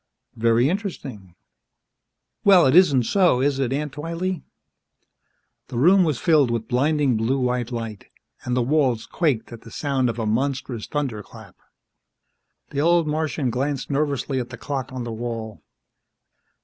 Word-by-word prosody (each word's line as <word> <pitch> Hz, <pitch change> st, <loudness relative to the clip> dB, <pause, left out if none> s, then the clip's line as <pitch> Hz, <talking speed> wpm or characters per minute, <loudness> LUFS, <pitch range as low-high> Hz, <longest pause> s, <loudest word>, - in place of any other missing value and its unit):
"Very 115 Hz, +2 st, +3 dB
interesting." 140 Hz, -, -5 dB, 1.1 s
"Well, 190 Hz, -4 st, +6 dB
it 135 Hz, +3 st, +3 dB
isn't 145 Hz, -9 st, +5 dB
so, 180 Hz, -, +3 dB
is 135 Hz, +1 st, +1 dB
it, 130 Hz, -2 st, 0 dB
Aunt 145 Hz, +1 st, -2 dB
Twylee?" 165 Hz, +3 st, -3 dB, 1.3 s
The 120 Hz, -, -6 dB
room 180 Hz, +9 st, +5 dB
was 155 Hz, -6 st, 0 dB
filled 150 Hz, -5 st, +3 dB
with 115 Hz, -1 st, -2 dB
blinding 140 Hz, 0 st, +1 dB
blue 115 Hz, +5 st, 0 dB
white 125 Hz, -1 st, -1 dB
light, 115 Hz, -4 st, -6 dB, 0.4 s
and 125 Hz, 0 st, -1 dB
the 125 Hz, -, +2 dB
walls 130 Hz, -4 st, +1 dB
quaked 125 Hz, -2 st, -1 dB
at 115 Hz, -, -10 dB
the 115 Hz, -, -13 dB
sound 135 Hz, 0 st, -1 dB
of 115 Hz, -, -4 dB
a 115 Hz, -, -2 dB
monstrous 125 Hz, 0 st, -2 dB
thunderclap. 130 Hz, -8 st, -5 dB, 1.2 s
The 140 Hz, -, -1 dB
old 170 Hz, +1 st, +3 dB
Martian 150 Hz, -4 st, -1 dB
glanced 135 Hz, +3 st, -2 dB
nervously 140 Hz, -2 st, -1 dB
at 125 Hz, -1 st, -5 dB
the 120 Hz, -, -9 dB
clock 135 Hz, -3 st, -4 dB
on 130 Hz, -1 st, -5 dB
the 120 Hz, -1 st, -5 dB
wall. 115 Hz, -2 st, -5 dB
130 Hz, 150 wpm, -23 LUFS, 120-150 Hz, 1.3 s, Well